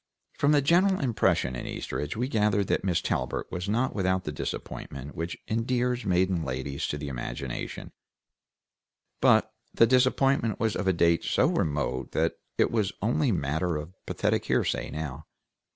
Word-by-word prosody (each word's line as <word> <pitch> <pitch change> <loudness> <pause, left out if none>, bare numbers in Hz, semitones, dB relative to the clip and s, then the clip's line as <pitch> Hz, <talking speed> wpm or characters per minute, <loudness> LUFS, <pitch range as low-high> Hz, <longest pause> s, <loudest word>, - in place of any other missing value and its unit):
From 145 - +2
the 145 -2 +4
general 185 +5 +4
impression 110 - +1
in - - -5
Eastridge 75 +7 -4
we 125 +2 0
gathered 105 -5 +2
that - - +1
Miss 90 -4 +1
Talbert - - -2
was 90 +3 -3
not 120 +5 +1
without 95 -2 0
the 75 - -3
disappointment 70 -1 -6
which 85 +1 -4
endears 120 +1 0
maiden 90 -2 +2
ladies 70 +1 -3
to 75 - -2
the 75 0 -5
imagination, 65 -1 -5 1.3
but - - +4 0.2
the 115 - +5
disappointment 130 -2 +2
was 110 -1 +1
of 95 - -2
a - - +5
date 85 -1 +3
so - - +2
remote 70 -4 -1
that 80 +1 +1 0.2
it - - +3
was 105 -4 +1
only 125 +4 +2
matter 80 0 0
of 75 +4 -7
pathetic - - 0
hearsay, - - 0
now. 75 -1 -6
95 Hz, 155 wpm, -28 LUFS, 75-120 Hz, 1.3 s, the